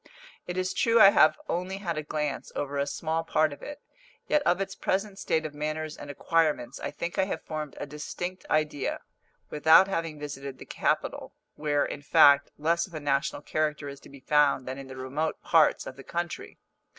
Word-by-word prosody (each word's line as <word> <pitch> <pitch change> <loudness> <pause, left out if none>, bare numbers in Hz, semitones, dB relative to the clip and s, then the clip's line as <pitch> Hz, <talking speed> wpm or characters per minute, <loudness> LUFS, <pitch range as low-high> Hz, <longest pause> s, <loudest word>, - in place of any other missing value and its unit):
It 180 0 -4
is 185 0 -1
true 230 0 +3
I 195 -2 +9
have 155 -4 +5
only 180 +2 -2
had 175 -4 -3
a 155 - -2
glance 150 -1 -3
over 140 0 -2
a 140 - 0
small 160 +2 -2
part 155 -2 +1
of - - -13
it; 290 0 -9 0.4
yet 300 - +3
of 180 - +3
its 195 - -3
present 195 +1 -2
state 160 -4 0
of 155 - -5
manners 155 +1 -3
and 145 - -10
acquirements 150 -4 0
I - - -3
think 170 +5 -5
I 190 - +4
have 175 -4 -4
formed 155 -2 -5
a - - -3
distinct 175 +5 -6
idea, 155 -3 0 0.5
without 160 +5 +6
having 165 -5 -3
visited 140 -2 -6
the - - -11
capital - - -2 0.2
where, 145 -1 0
in - - -6
fact, 140 0 +6
less 170 +4 +1
of 175 - -13
a - - -3
national 145 0 -1
character 150 -2 -1
is 140 0 -8
to - - -16
be 140 -1 -14
found 145 -2 +2
than 130 +1 -5
in 135 - -9
the 130 0 -9
remote 140 +5 -2
parts 160 -2 +3
of 130 - -8
the 135 - -10
country. 175 +2 -5
155 Hz, 200 wpm, -28 LUFS, 145-170 Hz, 0.5 s, I